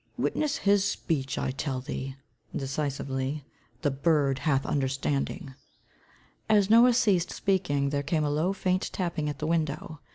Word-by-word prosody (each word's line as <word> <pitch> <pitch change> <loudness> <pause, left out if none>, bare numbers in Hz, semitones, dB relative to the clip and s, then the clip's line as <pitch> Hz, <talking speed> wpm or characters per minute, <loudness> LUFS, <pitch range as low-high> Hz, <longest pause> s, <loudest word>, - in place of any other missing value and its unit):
Witness 300 -2 0
his 200 -1 +3
speech, 160 -8 -1
I - - -1
tell 135 -1 -3
thee," 135 0 -5 0.4
decisively, 135 0 -2 0.4
"the 145 - +2
bird 140 -1 +2
hath 135 -3 +1
understanding." 135 0 -1 1.0
As 210 -1 +4
Noah 240 +2 +7
ceased 190 -8 +3
speaking, 145 -8 0
there 140 -1 0
came 155 +2 0
a 145 - 0
low, 155 +6 +1
faint 185 -1 0
tapping 170 -5 -2
at 145 - -5
the 155 - -3
window. 160 -1 -1
150 Hz, 140 wpm, -28 LUFS, 135-185 Hz, 1.0 s, Noah